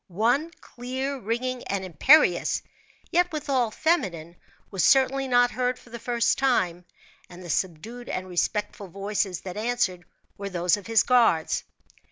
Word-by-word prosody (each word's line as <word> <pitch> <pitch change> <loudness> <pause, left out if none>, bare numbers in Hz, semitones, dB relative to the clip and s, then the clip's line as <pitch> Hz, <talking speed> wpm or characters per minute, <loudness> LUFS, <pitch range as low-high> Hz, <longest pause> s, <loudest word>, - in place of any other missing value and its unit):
One, 235 - +1
clear, 260 +3 -5
ringing, 245 +3 -3
and 195 -1 -3
imperious, 185 - +4 0.5
yet 355 +1 +2
withal 270 -6 0
feminine, 180 - -1 0.4
was 190 -3 -1
certainly 270 0 +3
not 245 -1 +4
heard 250 0 -1
for 240 - -18
the 235 - -7
first 235 0 0
time; 180 -10 +1 0.4
and 180 +1 -12
the 175 - -4
subdued 205 +10 -3
and 185 0 -4
respectful 200 +3 -2
voices 195 0 -2
that 185 +1 -7
answered, 215 -6 -1 0.3
were 200 0 -4
those 175 -1 +1
of 205 -2 -10
his 225 -1 +4
guards. 230 -11 +2
225 Hz, 145 wpm, -25 LUFS, 185-255 Hz, 0.5 s, imperious